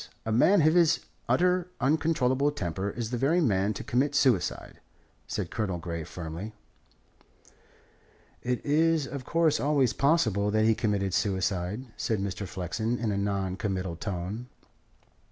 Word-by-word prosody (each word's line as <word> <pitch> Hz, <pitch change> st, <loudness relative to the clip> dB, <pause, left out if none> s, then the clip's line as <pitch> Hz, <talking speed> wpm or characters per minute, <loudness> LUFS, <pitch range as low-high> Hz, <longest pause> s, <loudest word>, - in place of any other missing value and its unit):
A 110 Hz, -, -2 dB
man 165 Hz, -, +5 dB
of 155 Hz, +1 st, +5 dB
his 170 Hz, -2 st, +4 dB, 0.3 s
utterly 180 Hz, 0 st, +3 dB
uncontrollable 140 Hz, -1 st, +2 dB
temper 95 Hz, -, -3 dB
is 115 Hz, +2 st, -5 dB
the 120 Hz, -, -2 dB
very 160 Hz, +6 st, +3 dB
man 100 Hz, -, +2 dB
to -, -, -5 dB
commit 140 Hz, +4 st, 0 dB
suicide," 125 Hz, -10 st, +1 dB, 0.5 s
said -, -, -3 dB
Colonel 105 Hz, -6 st, -2 dB
Grey 85 Hz, -1 st, -5 dB
firmly. 85 Hz, +6 st, -7 dB, 1.9 s
"It 125 Hz, 0 st, -2 dB
is, 160 Hz, +1 st, +3 dB
of 135 Hz, -2 st, -7 dB
course, 165 Hz, -4 st, +2 dB
always 135 Hz, -2 st, +2 dB
possible 110 Hz, -, +2 dB
that 110 Hz, +1 st, +2 dB
he 110 Hz, -, +5 dB
committed 105 Hz, -4 st, -1 dB
suicide," 95 Hz, +2 st, -1 dB
said 110 Hz, -, 0 dB
Mr. 100 Hz, 0 st, -4 dB
Flexen 110 Hz, +7 st, -2 dB
in 115 Hz, -3 st, -1 dB
a -, -, -1 dB
non 100 Hz, -2 st, -1 dB
committal 95 Hz, -4 st, -2 dB
tone. 100 Hz, +6 st, -5 dB
110 Hz, 140 wpm, -28 LUFS, 95-140 Hz, 1.9 s, man